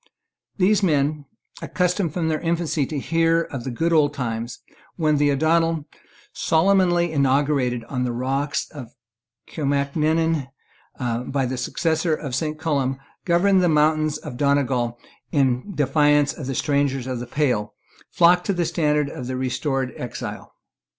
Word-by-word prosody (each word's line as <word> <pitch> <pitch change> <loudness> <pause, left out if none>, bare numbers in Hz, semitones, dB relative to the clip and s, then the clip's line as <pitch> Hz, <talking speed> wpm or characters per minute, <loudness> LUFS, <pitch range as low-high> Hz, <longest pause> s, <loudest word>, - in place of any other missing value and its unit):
These 205 +2 +3
men, 150 -4 +1 0.4
accustomed 180 -1 0
from 170 -3 0
their 155 -1 0
infancy 165 -4 -1
to 155 - -4
hear 165 +3 +2
of 135 -7 -7
the - - -2
good 165 +8 0
old 145 -2 +3
times, 115 -3 -4 0.4
when 155 -3 +1
the 145 0 +3
O'Donnel, 160 +2 +1 0.5
solemnly 175 0 +2
inaugurated 135 -3 +1
on 125 -2 -3
the 125 - -1
rock 135 +4 -2 0.2
of 130 -6 -8 0.6
Kilmacrenan 150 +1 0 0.5
by 125 +2 -2
the 130 +1 -3
successor 160 +5 0
of 140 -4 -6
Saint 155 +3 -2
Columb, 140 -4 -1 0.3
governed 185 +2 +3
the 175 - +3
mountains 155 0 +2
of 135 -5 -8
Donegal 130 -4 +1 0.3
in 135 +4 +1
defiance 145 0 +3
of 140 - -7
the 135 - -3
strangers 140 -3 0
of 130 -2 -3
the 120 - -6
pale, 120 -7 -1 0.3
flocked 175 +1 +4
to 200 - +2
the 175 -2 0
standard 150 -3 +1
of 125 -3 -7
the 130 0 -3
restored 130 +1 -2
exile. 125 - -7
145 Hz, 145 wpm, -23 LUFS, 130-165 Hz, 0.6 s, flocked